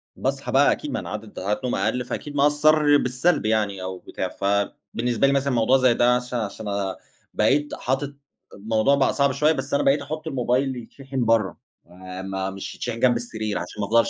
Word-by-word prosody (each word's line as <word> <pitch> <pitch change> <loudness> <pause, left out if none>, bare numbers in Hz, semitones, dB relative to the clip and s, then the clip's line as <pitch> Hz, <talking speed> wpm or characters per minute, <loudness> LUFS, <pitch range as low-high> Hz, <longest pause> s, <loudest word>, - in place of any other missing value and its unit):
باصحى - - -2
بقى - - +5
أكيد، - - -3
ما - - -1
أنا - - -7
عدد 105 0 -7
ساعات 105 +3 -2
نوم 125 - 0
أقل، 125 0 0
فأكيد 145 +4 -6
مأثّر 150 +1 +4
بالسلب 130 +4 +1
يعني 105 -3 0
أو 95 0 -5
بتاع، - - -5
فبالنسبة 110 +5 -1
لي 140 - +2
مثلًا 140 -1 +1
موضوع 120 +3 +4
زي 130 -2 +4
ده 120 +1 +4
عش 125 0 -4
عشان 110 -2 -3 0.7
بقيت 145 +7 +2
حاطط 135 +2 -2 0.4
الموضوع 110 +6 +2
بقى 140 -1 +2
صعب 140 -1 +2
شوية، 150 +4 +3
بس 135 -2 -5
أنا 140 - +2
بقيت 140 +1 +3
أحُط 155 +3 -6
الموبايل 130 -1 0
يتشحن 130 +2 -5
برّه 115 -3 +2 0.7
م 95 0 -3
مش 100 - -7
يتشحن 120 -2 -4
جنب 120 0 +4
السرير، 110 -3 -3
عشان - - -6
ما 100 - -1
أفضلش 115 +2 +3
125 Hz, 185 wpm, -24 LUFS, 110-140 Hz, 0.7 s, بقى